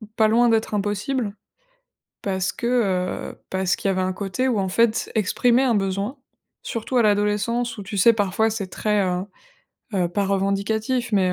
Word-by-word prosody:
pas 220 - +4
loin 235 +2 +4
d'être 220 -1 +1
impossible, 210 +2 -1 0.9
parce 190 -2 -1
que, 235 - -3 0.6
heu, - - -19
parce 190 -1 0
qu'il 195 - -2
y - - +3
avait 185 0 0
un 185 0 -1
côté 205 +7 -2
où, 235 -5 +1
en 190 -1 -1
fait, 225 +3 +1
exprimer 240 +5 +3
un 245 -3 +2
besoin, 200 +6 -1 0.5
surtout 230 +3 -2
à - - +5
l'adolescence 210 +3 +1
où, 205 - -6
tu 200 +1 -6
sais, 230 +5 +7
parfois, 210 +1 +1
c'est 210 -3 -3
très, 210 +2 0
heu 180 -1 -1 0.7
heu, 180 -3 +1
pas 200 +3 -1
revendicatif 215 +5 0
mais 185 -3 +3
210 Hz, 175 wpm, -23 LUFS, 195-230 Hz, 0.9 s, sais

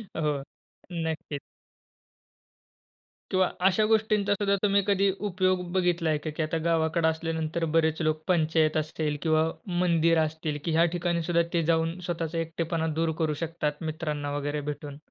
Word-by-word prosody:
हो, 150 -3 -1 0.5
नक्कीच. 160 -3 -3 1.9
किंवा 185 -1 +4 0.2
अशा 195 +3 +3
गोष्टींचासुद्धा 205 -2 +2
तुम्ही 200 -1 +4
कधी 200 0 +3 0.2
उपयोग 185 0 +1
बघितलाय 175 -4 +2
का, 150 +2 -5
की 155 +1 -2
आता 155 +1 -1
गावाकडे 160 0 +2
असल्यानंतर 160 0 -1
बरेच 160 0 +2
लोक 155 0 0
पंचायत 160 -3 +2
असतील 155 -1 -1
किंवा 160 -1 +3 0.4
मंदिर 165 -1 +3
असतील, 155 -1 -3
की 165 - 0
ह्या 165 +2 +4
ठिकाणीसुद्धा 170 0 +1
ते 170 -1 +2
जाऊन 165 +2 0
स्वतःचा 165 -2 -3
एकटेपणा 165 0 -2
दूर 165 -1 +2
करू 155 -1 +1
शकतात, 155 -2 -3
मित्रांना 150 -2 -3
वगैरे 145 +1 -2
भेटून. 145 -1 -8
165 Hz, 135 wpm, -27 LUFS, 155-175 Hz, 1.9 s, किंवा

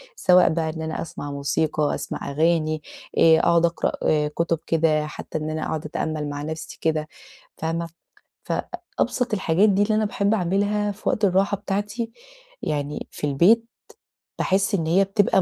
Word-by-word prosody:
سواء 180 - +5
بقى 160 0 0
إن 160 0 -5
أنا 160 0 -3
أسمع 145 -3 -7
موسيقى، 145 +2 0
أسمع 145 0 -5
أغاني، 155 0 +1 0.4
آآ 160 -1 +7
أقعد 170 0 +4
أقرأ 170 0 0 0.4
كتب 165 +1 -1
كده، 155 -2 +2
حتى 150 - -6
إن 155 0 -3
أنا 155 0 -3
أقعد 155 -1 -3
أتأمل 150 0 -3
مع 145 0 -5
نفسي 160 +1 -6
كده، 155 -1 0 0.5
فاهمة؟ 165 +1 -2 0.6
فأبسط 255 -9 -2
الحاجات 190 +1 +3
دي 200 0 +3
اللي 215 +1 +2
أنا 215 - +2
باحب 205 0 +1
أعملها 205 +2 0
في 205 - -5
وقت 215 - 0
الراحة 195 +2 +2
بتاعتي، 205 +4 -3 0.5
يعني 145 0 -3
في - - -4
البيت، 185 +12 +4 0.8
باحس 195 +2 +2
إن 165 -4 -1
هي 180 +4 +4
بتبقى 195 0 +2
165 Hz, 155 wpm, -23 LUFS, 155-200 Hz, 0.8 s, آآ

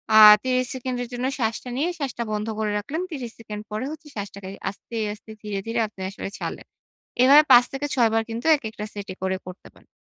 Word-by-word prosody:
আ - - +9 0.3
৩০ 255 0 +1
সেকেন্ডের 250 -1 -3
জন্য 245 +1 -2
শ্বাসটা 230 +1 -1
নিয়ে 310 +6 +1
শ্বাসটা 265 -5 -3
বন্ধ 210 +1 -2
করে 215 -1 0
রাখলেন। 280 +11 -3
৩০ 285 -7 -5 0.2
সেকেন্ড 210 -2 -7
পরে 215 +5 -2
হচ্ছে 315 0 -10
শ্বাসটাকে 200 -2 -6 0.2
আস্তে, 205 +4 -10 0.2
আস্তে 215 +1 -15
ধীরে, 210 -2 -3
ধীরে 230 +1 -1
আপনি 200 -2 -13
আসলে 195 0 -6
ছাড়লেন। - - -5 0.6
এভাবে 285 +4 +8
৫ 245 - +10
থেকে 280 +2 -3
৬ 235 -3 +4
বার 225 0 +2
কিন্তু 230 +2 -5
একেকটা 220 -5 -6
set 205 -1 -7
এ - - -15
করে 190 0 0
করতে 185 +1 -10
পারেন। - - -23
230 Hz, 205 wpm, -24 LUFS, 210-255 Hz, 0.6 s, ৫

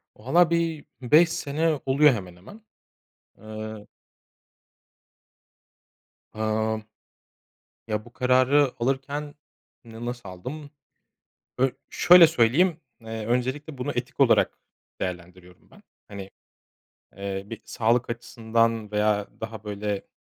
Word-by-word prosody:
Vallahi 160 +9 +3
bir 165 -2 -1 0.2
5 155 +7 +5
sene 155 0 -1
oluyor 140 +2 +5
hemen 95 -6 -6
hemen. 100 - -14 0.8
Eee 110 -1 -8 2.5
Emm. 110 0 -1 1.0
Ya, 105 -1 -3
bu 120 - -16
kararı 130 +2 +3
alırken 140 +4 -2 0.5
n 115 0 -9
nasıl 120 -4 -6
aldım? 140 +11 -8 0.9
Ö 130 +1 +3 0.2
şöyle 175 -1 +7
söyleyeyim, 160 +5 +2 0.2
eee, 110 -1 -6
öncelikle 130 +5 -2
bunu 125 - -3
etik - - -5
olarak - - +3 0.4
değerlendiriyorum 90 0 -7
ben. - - -19 0.2
Hani, 100 -1 -9 0.9
eee, 100 0 -4
bir 115 +2 -9
sağlık 120 +2 0
açısından 115 -2 -1
veya 105 -1 +1
daha 110 -1 -7
böyle, 105 -1 -4
115 Hz, 100 wpm, -25 LUFS, 105-140 Hz, 2.5 s, şöyle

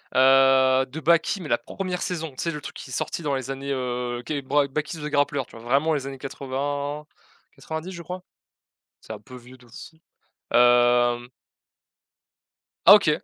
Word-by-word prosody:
heu, 130 0 +5
de 140 +5 -8
Baki, 170 +5 +2
mais 155 - -7
la 120 - +3
1re 180 +9 -5
saison. 165 -3 -3
Tu 130 - -21
sais 170 - -1
le 150 -2 -6
truc - - -9
qui 130 - -10
est - - -6
sorti 165 - -3
dans 140 -2 0
les 130 0 -4
années 135 +1 -5
heu, 125 -1 -3
qué 145 0 -3
bre 140 +1 +1
Baki 155 +4 -3
The 150 - -6
Grappler, 145 -1 +1
tu - - -13
vois? 115 - -13
Vraiment 140 +6 +2
les 140 -3 -2
années 135 0 -7
80-90, 145 +5 -6
je 175 -2 -8
crois? 180 +1 -7 0.8
C'est - - -11
un 105 - -9
peu 125 +5 -13
vieux 125 +1 -13
de 125 -1 -20
fou. 160 +7 -12 0.5
Hem 120 0 +4 1.6
Ah 195 - +12
OK, 205 -6 +6
135 Hz, 180 wpm, -24 LUFS, 125-155 Hz, 1.6 s, Ah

